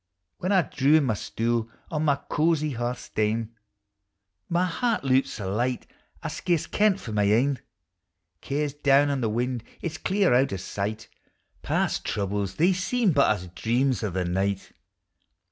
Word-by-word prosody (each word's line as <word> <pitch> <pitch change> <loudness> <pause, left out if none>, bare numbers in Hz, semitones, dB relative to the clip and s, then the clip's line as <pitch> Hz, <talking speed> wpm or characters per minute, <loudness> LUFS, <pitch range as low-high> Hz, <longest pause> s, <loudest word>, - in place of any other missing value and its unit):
When 185 - -1
I 190 -3 +5
draw 140 0 +2
in 155 - +3
my 125 -5 +1
stool 115 +2 -1 0.2
ou 150 - 0
my 150 -2 +3
cozy 155 -1 +1
hearth 120 0 -2
stane, 110 +1 -2 1.0
My 175 +1 +2
heart 230 - 0
loups 135 0 +2
sae 105 - -6
light 120 +6 -1 0.4
I - - -2
scarce 175 -4 0
ken 210 -1 +3
't - - -11
for 115 - -7
my 105 -1 +2
ain; 125 +7 +2 0.8
Care 145 +2 -1
's 140 - -7
down 145 0 +3
on 140 -2 -1
the 115 - +1
wind, 120 +1 -1 0.2
it 170 - -3
is 160 - -7
clean 195 -5 +2
out 130 0 +3
o' - - -2
sight, 100 +3 -4 0.5
Past - - 0
troubles 100 -1 -2
they 175 +4 +4
seem 200 +3 +1
but 140 -5 +4
as 95 -4 -1
dreams 120 +8 0
o' 105 - -1
the 90 0 -2
night. 95 +2 -1
130 Hz, 175 wpm, -26 LUFS, 110-155 Hz, 1.0 s, I